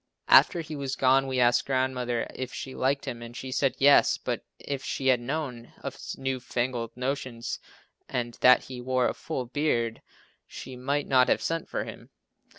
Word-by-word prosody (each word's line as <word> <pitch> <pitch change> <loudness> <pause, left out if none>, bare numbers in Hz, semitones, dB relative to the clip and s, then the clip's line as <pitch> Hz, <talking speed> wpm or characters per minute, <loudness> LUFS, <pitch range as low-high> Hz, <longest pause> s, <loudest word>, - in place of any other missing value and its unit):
After 175 - +7
he 155 -1 -7
was 135 -2 -3
gone, 135 +1 +3
we 130 -1 -1
asked 120 -1 +3
Grandmother 130 -3 0
if 130 -1 -5
she 135 - -6
liked 135 +2 0
him 120 - -5
and 120 +1 -9
she 130 - -6
said 135 +1 +1
yes, 140 +1 +6
but - - -3
if 140 -1 -5
she 135 - -3
had 125 -2 +4
known 125 -2 -4
of - - -4
his - - -8
"new 135 -1 -2
fangled" 120 -1 -3
notions 125 -2 -3 0.5
and 120 -1 -2
that 125 0 +7
he 125 -1 -8
wore 130 0 +1
a - - -1
full 135 -6 -4
beard 120 -4 -1 0.5
she 130 - -9
might 140 +3 -1
not 130 -1 +4
have - - +3
sent 165 0 -2
for - - -2
him! - - -10
130 Hz, 185 wpm, -27 LUFS, 125-135 Hz, 0.5 s, After